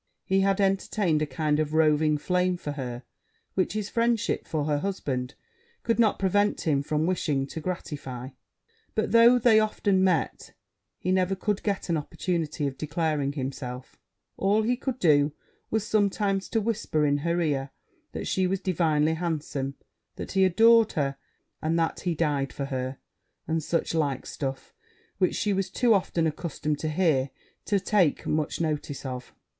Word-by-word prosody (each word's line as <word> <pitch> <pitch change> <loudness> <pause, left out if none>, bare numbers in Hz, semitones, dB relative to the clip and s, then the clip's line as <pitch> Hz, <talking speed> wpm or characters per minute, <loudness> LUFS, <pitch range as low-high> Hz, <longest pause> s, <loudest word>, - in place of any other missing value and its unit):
He 190 0 +2
had 195 +1 +2
entertained 195 -4 +1
a 155 - 0
kind 150 +2 0
of 155 0 -1
roving 155 -1 +3
flame 180 +3 +1
for 150 - -5
her, 125 -3 -5 0.5
which 185 0 0
his 215 -2 -2
friendship 230 0 0
for 155 -2 -1
her 145 -1 0
husband 140 -9 -3 0.5
could 230 0 0
not 220 -3 +4
prevent 205 +2 +1
him 145 -4 +1
from 150 +2 0
wishing 150 -6 0
to 150 - -7
gratify; 140 -7 -5 0.7
but, 220 - 0
though 235 +2 +7
they 225 -2 +5
often 200 -3 +1
met, 185 -4 0 0.4
he 185 - -2
never 185 0 +2
could 205 +1 -1
get 200 -2 -2
an 170 -2 +1
opportunity 155 0 -2
of 135 -1 -4
declaring 155 -2 -1
himself: 130 -2 -6 0.4
all 205 +3 +2
he 245 +3 +2
could 260 0 -3
do 150 - +3 0.4
was 220 -1 0
sometimes 200 -2 +1
to 225 - +1
whisper 210 -8 0
in 145 0 +2
her 170 +4 0
ear 140 -5 0 0.4
that - - -4
she 185 -1 +1
was 195 +1 -1
divinely 160 -4 +1
handsome 155 -5 -3 0.4
that - - -6
he 190 -1 +3
adored 225 +4 +5
her 140 -2 0 0.5
and 160 +2 0
that 165 -1 0
he 175 -2 -1
died 145 -4 0
for 140 - -4
her 130 -1 -3 0.5
and 160 0 0
such 165 +2 -1
like 145 -5 0
stuff; 135 -2 -5 0.5
which 185 - +2
she 205 -1 0
was 190 0 -1
too 235 +4 +3
often 180 -4 +1
accustomed 155 -2 -2
to 155 - -2
hear 150 -5 +2 0.4
to 200 - +2
take 190 -5 +2
much 150 -1 -1
notice 150 -3 -3
of. 125 -1 -6
165 Hz, 165 wpm, -27 LUFS, 145-195 Hz, 0.7 s, though